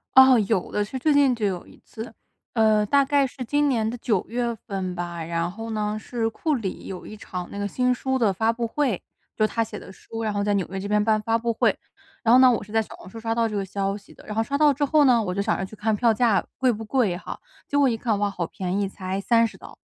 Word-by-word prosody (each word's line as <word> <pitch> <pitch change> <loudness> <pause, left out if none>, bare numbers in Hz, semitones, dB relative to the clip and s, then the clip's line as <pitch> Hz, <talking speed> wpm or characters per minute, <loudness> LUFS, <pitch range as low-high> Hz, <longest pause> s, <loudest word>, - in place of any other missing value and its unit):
哦， 265 -1 +9
有 205 -5 0
的。 210 - 0
是 235 +6 -5
最 300 +4 +2
近 280 -3 +4
就 225 -3 -2
有 185 -3 -2
一 - - -17
次， 225 +2 -8 0.4
呃， 215 -2 +3
大 280 +6 +3
概 280 0 +3
是 255 0 -7
今 290 +4 +2
年 225 -5 +1
的 235 - -4
九 215 -5 0
月 240 0 -1
份 190 -3 -5
吧， 175 -1 -4
然 170 +1 -2
后 225 +4 -7
呢， 215 -1 -2
是 225 +1 -2
库 305 +6 -1
里 205 -6 -5
有 185 -2 -7
一 215 - -9
场 180 -3 -6
那 - - -7
个 205 - -1
新 250 +4 +1
书 265 +1 -1
的 220 -6 +2
发 220 +4 +2
布 235 0 -3
会， 250 -5 0 0.3
就 215 - +3
他 230 +1 0
写 215 -1 -7
的 - - -11
书， 225 +3 -7
然 215 -1 -1
后 205 0 0
在 205 0 +1
纽 195 -3 0
约 195 +1 -4
这 195 - -4
边 210 0 +2
办 215 -1 +2
发 225 +2 +1
布 230 0 -1
会。 - - +2 0.5
然 230 -1 +5
后 255 - +8
呢， 260 -1 +7
我 235 - 0
是 210 - -14
在 225 0 +3
小 220 - -9
红 - - -13
书 225 - -9
刷 225 0 -1
到 230 0 +1
这 215 - -5
个 200 - 0
消 195 +1 -2
息 200 -1 -13
的。 - - -17
然 210 - -6
后 225 - +2
刷 280 +4 -2
到 295 -1 +5
之 285 +2 -2
后 295 +1 +4
呢， 245 -3 +5
我 180 -3 -2
就 200 - -1
想 215 +2 0
着 190 - -2
去 205 - -11
看 215 +1 0
票 230 +1 +3
价 225 -1 +2
贵 260 -2 +3
不 225 -1 -5
贵 220 -5 +1
哈。 180 - -7 0.3
结 285 - 0
果 285 -1 +5
一 240 - +1
看， 220 -1 -1
哇， 205 0 +1
好 180 -3 -3
便 190 0 -3
宜 200 - -1
才 190 0 -4
30 230 +1 +2
刀。 - - -13
220 Hz, 300 characters per minute, -24 LUFS, 200-245 Hz, 0.5 s, 哦